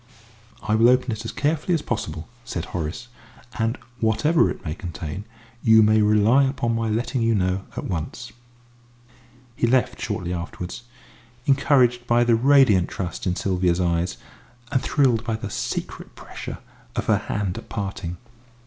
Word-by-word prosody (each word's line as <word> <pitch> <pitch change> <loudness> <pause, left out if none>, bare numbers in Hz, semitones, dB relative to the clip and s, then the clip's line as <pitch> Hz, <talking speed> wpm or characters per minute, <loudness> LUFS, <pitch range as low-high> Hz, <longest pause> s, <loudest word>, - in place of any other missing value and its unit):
"I 110 - 0
will 115 +2 +5
open 125 0 +3
it 110 +1 -5
as 115 - -3
carefully 155 +4 0
as 155 - -2
possible," 80 -9 -4 0.2
said 85 -7 -4
Horace, 90 +9 -4 0.5
"and 115 +2 0 0.2
whatever 115 +10 +3
it - - -7
may 75 - -2
contain, 85 +1 -6 0.4
you 110 -1 +6
may 110 0 +4
rely 105 +6 +4
upon 125 -3 -1
my 115 -1 -1
letting 120 +3 -1
you 115 0 +2
know 95 0 0
at - - -3
once." 95 +7 -4 1.2
He 120 - +1
left 130 +1 +1
shortly 90 0 -3
afterwards, 90 +5 -6 0.6
encouraged 130 -3 +3
by 120 0 +4
the 120 -1 +3
radiant 125 -6 +5
trust 90 0 -4
in 90 - +1
Sylvia's 90 -2 +1
eyes, 85 -4 0 0.5
and 130 - +2
thrilled 130 -6 +2
by 115 -2 -1
the 105 -2 -6
secret - - -4
pressure - - -8 0.4
of - - -1
her - - +3
hand 100 -3 -1
at - - -15
parting. 95 -4 -4
110 Hz, 155 wpm, -23 LUFS, 90-120 Hz, 1.2 s, you